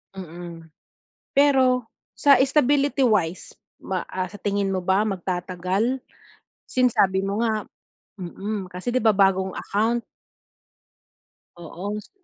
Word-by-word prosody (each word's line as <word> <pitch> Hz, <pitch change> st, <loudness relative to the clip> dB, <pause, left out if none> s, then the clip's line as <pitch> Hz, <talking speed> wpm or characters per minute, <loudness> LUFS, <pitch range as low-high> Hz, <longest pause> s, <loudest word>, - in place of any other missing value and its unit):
Mm. 170 Hz, -2 st, -9 dB, 0.7 s
Pero, 260 Hz, -4 st, +4 dB, 0.3 s
sa 280 Hz, -1 st, +6 dB
stability 280 Hz, 0 st, +2 dB
wise 185 Hz, -6 st, 0 dB, 0.3 s
ma 185 Hz, -2 st, -3 dB
ah, 185 Hz, -1 st, -3 dB
sa 205 Hz, -, -10 dB
tingin 200 Hz, 0 st, -1 dB
mo 185 Hz, -1 st, -1 dB
ba 190 Hz, +4 st, +2 dB
magtatagal? 185 Hz, +5 st, -2 dB, 0.7 s
Since, 250 Hz, -2 st, +2 dB
sabi 190 Hz, 0 st, +3 dB
mo 200 Hz, +2 st, -1 dB
nga, 220 Hz, -2 st, 0 dB, 0.6 s
mm 195 Hz, +2 st, -5 dB
kasi 185 Hz, +7 st, -4 dB
'di 255 Hz, -, +2 dB
ba 220 Hz, -, +6 dB
bagong 190 Hz, -1 st, +3 dB
account. 225 Hz, +4 st, 0 dB, 1.5 s
Oo 175 Hz, +3 st, -8 dB
s. -, -, -15 dB
200 Hz, 120 wpm, -24 LUFS, 185-240 Hz, 1.5 s, sa